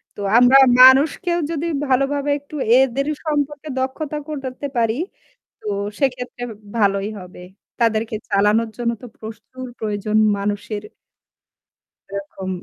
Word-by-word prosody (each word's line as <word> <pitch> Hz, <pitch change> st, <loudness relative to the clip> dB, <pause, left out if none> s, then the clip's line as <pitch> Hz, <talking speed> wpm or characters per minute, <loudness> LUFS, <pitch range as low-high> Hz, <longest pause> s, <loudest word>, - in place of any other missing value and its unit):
তো -, -, -12 dB, 0.2 s
আমরা 250 Hz, +2 st, +7 dB, 0.2 s
মানুষকেও 290 Hz, +7 st, +6 dB
যদি 325 Hz, 0 st, -2 dB, 0.2 s
ভালোভাবে 275 Hz, +2 st, +1 dB
একটু 285 Hz, +2 st, -13 dB, 0.2 s
এদের 270 Hz, +2 st, +1 dB, 0.2 s
সম্পর্কে 295 Hz, 0 st, -2 dB
দক্ষতা 290 Hz, +3 st, -3 dB
করতে 275 Hz, -1 st, -5 dB
পারি 225 Hz, -1 st, +2 dB, 0.7 s
তো -, -, -20 dB, 0.3 s
সেক্ষেত্রে 250 Hz, -2 st, -2 dB, 0.3 s
ভালোই 200 Hz, -1 st, +1 dB
হবে। 180 Hz, -1 st, -12 dB, 0.4 s
তাদেরকে 225 Hz, -1 st, +1 dB
চালানোর 210 Hz, +3 st, +2 dB
জন্য 235 Hz, -1 st, 0 dB
তো -, -, -9 dB
প্রচুর 225 Hz, +4 st, -9 dB
প্রয়োজন 210 Hz, 0 st, -1 dB, 0.2 s
মানুষের। 205 Hz, +1 st, -3 dB, 1.3 s
এরকম। 195 Hz, -1 st, -6 dB
245 Hz, 110 wpm, -20 LUFS, 215-275 Hz, 1.3 s, আমরা